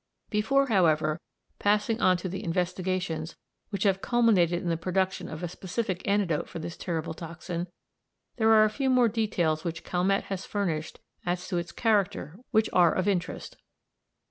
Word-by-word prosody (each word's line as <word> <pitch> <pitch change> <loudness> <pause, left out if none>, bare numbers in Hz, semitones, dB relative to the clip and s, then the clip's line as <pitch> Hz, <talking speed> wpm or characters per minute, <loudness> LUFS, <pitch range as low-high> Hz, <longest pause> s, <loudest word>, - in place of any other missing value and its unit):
Before, 255 +6 +3
however, 160 - +2 0.4
passing 210 +2 +1
on 185 -1 +4
to 175 - -5
the 190 +2 -5
investigations 180 -2 -2 0.3
which 200 -2 -2
have 195 -2 +2
culminated 195 -8 +3
in 175 - -1
the 165 - +2
production 185 +3 -1
of 155 +2 -7
a - - -1
specific 185 +2 -3
antidote 200 -6 +1
for - - -7
this 165 +1 -5
terrible 165 -3 -3
toxin, 170 +1 -5 0.7
there 220 -2 +3
are 215 -1 +7
a 215 - +4
few 270 +3 -1
more 250 -2 +5
details 180 -8 0
which 165 -1 -4
Calmette 185 +2 +1
has 195 -1 -5
furnished 165 -7 -3 0.2
as 180 +1 -2
to 180 - -1
its 170 - -6
character 200 -5 0
which 220 -2 +3
are 175 -2 +6
of 185 +1 0
interest. 185 -2 -2
185 Hz, 165 wpm, -28 LUFS, 170-210 Hz, 0.7 s, are